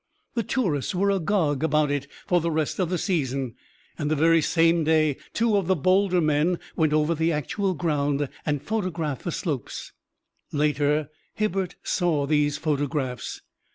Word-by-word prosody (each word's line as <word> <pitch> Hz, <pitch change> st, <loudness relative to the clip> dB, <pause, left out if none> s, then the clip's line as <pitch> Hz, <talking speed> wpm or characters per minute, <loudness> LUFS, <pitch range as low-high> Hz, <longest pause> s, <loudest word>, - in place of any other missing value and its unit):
The 235 Hz, -, 0 dB
tourists 185 Hz, -, -1 dB
were 200 Hz, +2 st, +2 dB
agog 170 Hz, -7 st, +1 dB
about 150 Hz, -2 st, +2 dB
it 140 Hz, -1 st, -2 dB, 0.2 s
for 175 Hz, -1 st, +2 dB
the 170 Hz, -, 0 dB
rest 155 Hz, +1 st, -1 dB
of 180 Hz, -3 st, +1 dB
the 180 Hz, -, 0 dB
season, 135 Hz, -, -1 dB, 0.5 s
and 150 Hz, -, -1 dB
the 155 Hz, -, +2 dB
very 165 Hz, +2 st, +4 dB
same 165 Hz, +1 st, +3 dB
day 155 Hz, -2 st, +3 dB, 0.2 s
two 225 Hz, -1 st, +2 dB
of 195 Hz, -4 st, -1 dB
the 190 Hz, -, +3 dB
bolder 185 Hz, +3 st, +3 dB
men 155 Hz, +3 st, +2 dB, 0.2 s
went 155 Hz, -2 st, +2 dB
over 155 Hz, +2 st, +2 dB
the 160 Hz, +1 st, +1 dB
actual 185 Hz, +5 st, -1 dB
ground 145 Hz, -2 st, 0 dB, 0.2 s
and 145 Hz, -2 st, -1 dB
photographed 175 Hz, -, -2 dB
the 175 Hz, -, -1 dB
slopes. 150 Hz, -, -4 dB, 0.6 s
Later 150 Hz, 0 st, +1 dB, 0.3 s
Hibbert 195 Hz, -4 st, -1 dB
saw 165 Hz, -7 st, +1 dB
these 145 Hz, 0 st, +2 dB
photographs. 145 Hz, -4 st, -2 dB
155 Hz, 155 wpm, -25 LUFS, 145-180 Hz, 0.6 s, very